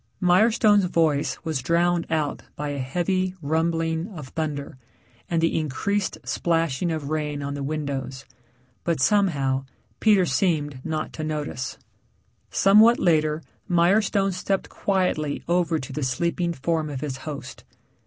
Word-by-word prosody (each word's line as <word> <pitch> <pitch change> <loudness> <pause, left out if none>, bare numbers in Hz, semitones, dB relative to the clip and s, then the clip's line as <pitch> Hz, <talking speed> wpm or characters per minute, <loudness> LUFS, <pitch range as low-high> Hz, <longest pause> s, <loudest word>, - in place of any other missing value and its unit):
Mirestone's 205 +2 +4
voice 160 -5 +1
was 160 -5 -2
drowned 170 +4 +1
out 155 -3 -1
by 150 0 -3
a 145 -1 -3
heavy 180 +7 -1
rumbling 165 +2 0
of 155 -11 -9
thunder 145 -4 -4 0.5
and 165 -1 +1
the 165 - +2
increased 185 +7 -1
splashing 165 -1 0
of 155 -2 -4
rain 150 -2 -2
on 140 0 -3
the 140 - -5
windows. 140 -2 -4 0.6
But 170 -3 0
somehow 140 -7 +2 0.3
Peter 205 -4 +4
seemed 145 -2 0
not 155 -1 -3
to 155 - -5
notice. 150 -4 -3 0.7
Somewhat 215 +4 +6
later 155 -2 +2 0.3
Mirestone 195 +2 +3
stepped 190 +2 -2
quietly 180 -7 -1
over 170 -2 +2
to 130 - -7
the 150 - -3
sleeping 170 +7 0
form 160 +1 -1
of 135 -3 -5
his 140 -3 -3
host. 145 +1 -8
160 Hz, 135 wpm, -24 LUFS, 145-180 Hz, 0.7 s, Somewhat